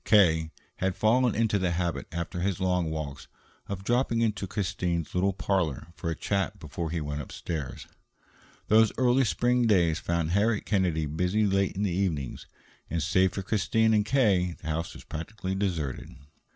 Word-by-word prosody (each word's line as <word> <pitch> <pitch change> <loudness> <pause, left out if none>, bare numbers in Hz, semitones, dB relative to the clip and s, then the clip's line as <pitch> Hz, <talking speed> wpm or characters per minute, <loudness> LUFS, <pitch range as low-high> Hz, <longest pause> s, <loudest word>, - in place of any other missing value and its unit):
K. 80 -7 +4 0.3
had 95 -1 0
fallen 120 +3 +3
into 110 -2 +2
the 90 -2 0
habit, 85 -5 -2
after 85 +1 -4
his 95 0 -1
long 90 -3 +1
walks, 75 -3 -5 0.4
of 95 -1 -5
dropping 120 +1 +1
into 105 -3 0
Christine's 90 -4 -2
little 95 +2 +2
parlor 95 -6 -1
for 80 +3 -4
a 80 - -1
chat 100 +1 -1
before 80 +2 -5
he 85 +1 -2
went 75 -1 -3
upstairs. 75 -2 -5 0.8
Those 110 0 +5
early 125 +1 +4
spring 120 +6 +2
days 85 -6 +3
found 85 -1 -1
Harriet 105 +3 +2
Kennedy 90 -6 +1
busy 90 +8 +1
late 95 -1 +1
in 100 - -1
the 100 - +1
evenings, 85 -8 -2 0.4
and, 85 -2 -1
save 95 +3 +3
for 95 - -3
Christine 110 +2 +2
and 105 -1 +4
K., 100 -8 +2
the 80 - -6
house 80 +2 -3
was - - -11
practically 95 +4 -5
deserted. 90 -9 -2
95 Hz, 165 wpm, -28 LUFS, 80-105 Hz, 0.8 s, Those